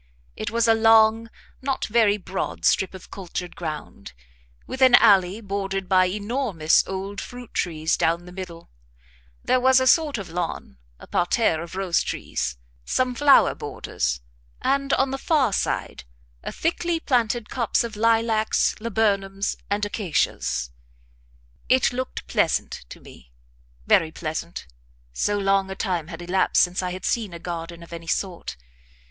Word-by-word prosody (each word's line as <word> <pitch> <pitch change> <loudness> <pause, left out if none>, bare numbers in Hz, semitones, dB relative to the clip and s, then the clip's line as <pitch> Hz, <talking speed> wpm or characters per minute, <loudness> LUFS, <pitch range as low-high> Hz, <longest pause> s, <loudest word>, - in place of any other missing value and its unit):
It - - -4
was 230 +1 +1
a 225 - +6
long, 225 0 +4 0.3
not 270 0 -1
very 215 -2 +3
broad 190 -1 -4
strip 190 0 +2
of 185 - -12
cultured 180 -2 -6
ground, 155 - -7 0.5
with 260 - -7
an 255 -2 +8
alley 195 +1 +5
bordered 195 -2 -3
by 185 0 +4
enormous 205 - +1
old 195 +1 -5
fruit 245 -1 -10
trees 160 -2 0
down 170 +2 0
the 180 - -11
middle; 180 -2 -9 0.7
there 255 - +3
was 260 +1 +5
a 260 - +1
sort 300 0 +3
of 190 -5 -7
lawn, 165 - -4 0.2
a - - -13
parterre 175 -2 +1
of 170 +1 -8
rose 190 -3 +1
trees, 65 -1 -3 0.3
some 255 - 0
flower 280 +2 +5
borders, 65 - -3 0.4
and, 275 0 +1
on 270 0 +2
the 270 - -3
far 270 -10 +2
side, - - -2 0.4
a - - -5
thickly 335 0 -1
planted 240 -6 0
copse 235 -4 +1
of 230 -2 -6
lilacs, 225 0 +2
laburnums, 200 -3 0
and 205 +1 0
acacias. 145 - -1 1.0
It 255 0 +3
looked 255 +1 -4
pleasant, - - -1
to - - -10
me - - -16 0.5
very 160 - +3
pleasant, 160 +1 -5 0.5
so 205 - 0
long 195 -1 +1
a 190 - -5
time 180 -6 -2
had 170 0 -8
elapsed 185 +2 +3
since 180 +1 -1
I 180 - -2
had 185 +1 -6
seen 215 -6 -1
a - - -5
garden 170 0 -6
of 170 - -12
any 165 0 -8
sort. 180 - -3
195 Hz, 150 wpm, -24 LUFS, 175-230 Hz, 1.0 s, an